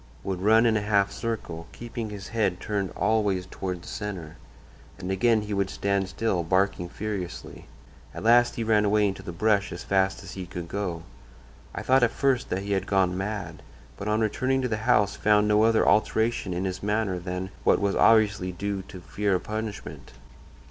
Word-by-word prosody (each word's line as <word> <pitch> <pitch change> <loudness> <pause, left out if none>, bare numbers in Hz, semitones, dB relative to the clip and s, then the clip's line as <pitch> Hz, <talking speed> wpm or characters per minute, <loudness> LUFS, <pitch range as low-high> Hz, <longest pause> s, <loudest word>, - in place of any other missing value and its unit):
would 95 -2 -3
run 110 +3 +5
in 115 -1 +3
a 105 - +1
half 100 -1 +2
circle, 100 -7 -5
keeping 115 -2 -6
his 100 -2 -8
head 100 -5 0
turned 100 -3 -2
always 100 -4 +1
toward 90 -2 -5
the - - -12
centre, 95 -7 -6 0.6
and 95 0 -4
again 110 +3 +2
he 105 0 -4
would 100 -1 0
stand 100 -1 -1
still, 100 -2 0
barking 90 +1 0
furiously. 100 -3 -6 0.4
At - - -8
last 120 +2 +5
he 115 - -2
ran 110 -1 +3
away 105 0 +3
into 95 - -4
the - - -7
brush 100 +3 +1
as 85 - -6
fast 95 0 +1
as - - -9
he 95 -2 -7
could 85 -1 -6
go. 90 -4 -3 0.7
I - - -4
thought 130 +1 +4
at 120 - +4
first 130 +1 0
that 95 +2 -2
he 100 - -4
had 95 -1 0
gone 95 -2 +2
mad, 100 +2 -4 0.3
but 100 - -6
on 105 +1 +1
returning 130 +5 0
to - - +1
the 110 -3 -1
house 105 -4 +4
found 105 0 +3
no 105 0 +4
other 115 0 +3
alteration 110 -2 +2
in 90 +2 -2
his 95 0 -3
manner 105 -3 0
than 90 +1 -5
what - - +4
was 100 -1 0
obviously 105 -4 +4
due 100 +2 -3
to 90 - -10
fear 100 +2 -1
of 90 - -2
punishment. 110 -1 -6
100 Hz, 195 wpm, -26 LUFS, 95-110 Hz, 0.7 s, run